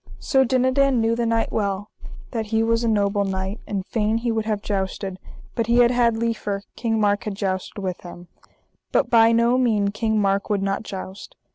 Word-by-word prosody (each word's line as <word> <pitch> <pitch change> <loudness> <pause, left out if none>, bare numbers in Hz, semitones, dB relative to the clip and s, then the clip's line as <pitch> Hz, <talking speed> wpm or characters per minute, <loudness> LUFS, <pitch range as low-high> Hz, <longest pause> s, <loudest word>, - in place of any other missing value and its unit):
Sir 265 -1 +2
Dinadan 260 +1 +2
knew 225 0 +2
the 235 0 -1
knight 225 0 0
well 200 -1 -2 0.4
that 225 -3 -3
he 220 +1 +1
was 230 +1 +1
a - - +1
noble 205 -2 +1
knight, 190 +2 -3
and 195 -2 -3
fain 220 0 0
he 235 0 -1
would 220 -1 -1
have 210 -2 -1
jousted, 190 -1 -3 0.3
but 230 -2 -1
he 235 0 +3
had 240 0 +5
had 235 -2 +2
liefer 215 -3 -2
King 225 -2 -1
Mark 205 -1 +1
had 210 -2 -3
jousted 190 -1 -3
with 185 -2 -3
him, 175 0 -11 0.6
but - - +1
by 225 -1 +6
no 235 +2 +3
mean 215 -5 +2
King 220 +1 0
Mark 195 0 0
would 200 -2 0
not 195 0 -1
joust. 190 -2 -8
220 Hz, 200 wpm, -23 LUFS, 200-230 Hz, 0.6 s, by